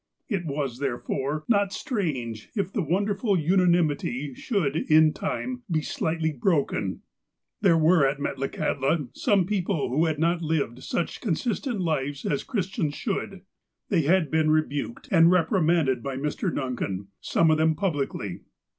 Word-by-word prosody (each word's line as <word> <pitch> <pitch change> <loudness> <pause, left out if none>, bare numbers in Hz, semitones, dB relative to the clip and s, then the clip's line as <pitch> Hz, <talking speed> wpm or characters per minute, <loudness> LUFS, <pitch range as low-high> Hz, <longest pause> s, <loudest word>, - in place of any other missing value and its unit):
It 195 -8 -2
was, 140 -4 -3
therefore, 140 +2 -2
not 200 -4 +2
strange, 145 - -3
if 200 -3 -2
the 210 - 0
wonderful 200 - 0
una 180 +3 +3
nimity 145 -5 0
should, 180 - -1
in 155 -1 +4
time, 250 +5 -3
be 155 -3 0
slightly 160 +1 -1
broken. 140 - 0 0.6
There 180 -5 +5
were 160 -2 +5
at 135 +1 -1
Metlakahtla 140 +1 -1
some 200 -6 +2
iDCople 185 -6 -1
who 150 +7 +2
had 160 -2 0
not 170 +2 +1
lived 150 -6 -1
such 170 - -3
con 195 -9 0
sistent 235 - -2
lives 145 -4 -2
as 140 - 0
Christians 185 - -2
should. 195 -3 -3 0.5
They 180 -5 +3
had 165 +2 +2
been 155 -1 +2
re 155 0 +4
buked 145 - -5
and 165 -3 +6
reprimanded 165 - +2
by 135 0 -4
Mr. 150 +6 -2
Duncan, 100 -9 -3
some 165 -1 +2
of 155 - +2
them 160 0 +3
publicly. 145 - -2
160 Hz, 150 wpm, -26 LUFS, 140-190 Hz, 0.6 s, and